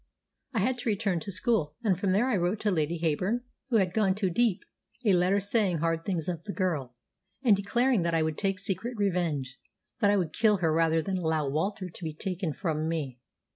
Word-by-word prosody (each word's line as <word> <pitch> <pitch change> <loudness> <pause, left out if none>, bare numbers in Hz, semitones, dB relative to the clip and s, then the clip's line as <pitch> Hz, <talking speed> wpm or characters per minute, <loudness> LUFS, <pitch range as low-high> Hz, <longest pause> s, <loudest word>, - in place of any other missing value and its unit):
I 220 - +2
had 250 +4 0
to 240 - -1
return 200 -4 0
to 200 - -5
school, 190 - 0
and 200 -5 +3
from 190 +2 0
there 210 +7 +3
I 255 - +2
wrote 180 +3 0
to 210 - +1
Lady 165 -1 0
Heyburn, 180 +9 0 0.3
who 240 - +1
had 185 -4 +1
gone 195 -3 +2
to 195 -3 0
Dieppe, 220 0 +1 0.4
a 205 - +5
letter 180 +3 +3
saying 200 -3 +1
hard 165 +1 -1
things 175 -6 -2
of 170 -3 -3
the 200 - -4
girl, 150 -10 -2 0.5
and 225 -6 +6
declaring 235 +3 +1
that 170 0 0
I 160 - +3
would 155 -1 -1
take 195 -2 0
secret 205 +6 -3
revenge 165 -10 -1 0.4
that 205 -3 +4
I 205 - +4
would 170 -5 -1
kill 215 -2 +3
her 165 -3 +1
rather 165 0 +2
than 190 +1 -2
allow 160 -3 0
Walter 185 +7 -1
to 180 +1 -11
be 155 -2 -4
taken 180 -1 -3
from 155 -1 -2
me. 140 -7 -3
185 Hz, 215 wpm, -28 LUFS, 165-205 Hz, 0.5 s, and